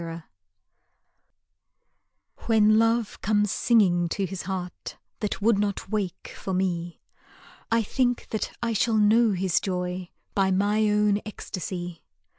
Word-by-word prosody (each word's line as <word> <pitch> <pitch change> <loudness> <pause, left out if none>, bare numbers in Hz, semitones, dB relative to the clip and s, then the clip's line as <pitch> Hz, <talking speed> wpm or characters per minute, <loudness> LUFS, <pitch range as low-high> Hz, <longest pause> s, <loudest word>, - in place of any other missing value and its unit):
Song 165 0 -6 2.2
When 215 -1 +5
Love 230 -1 +1
comes 210 -1 +2
singing 180 -7 +3
to 195 +3 -1
his 190 0 -5
heart 180 -2 -5 0.2
That 210 -1 -3
would 220 -2 +4
not 205 -1 -2
wake 200 -5 -3
for 190 - -4
me, 175 -2 -2 0.7
I 230 0 +3
think 245 +2 0
that 220 - -2
I 230 -1 0
shall 220 +1 +2
know 215 +1 +4
his 185 -1 +1
joy 180 -1 -3 0.2
By 195 -1 +2
my 205 +3 +2
own 210 0 +2
ecstasy. 175 -4 -6
200 Hz, 125 wpm, -26 LUFS, 180-215 Hz, 2.2 s, When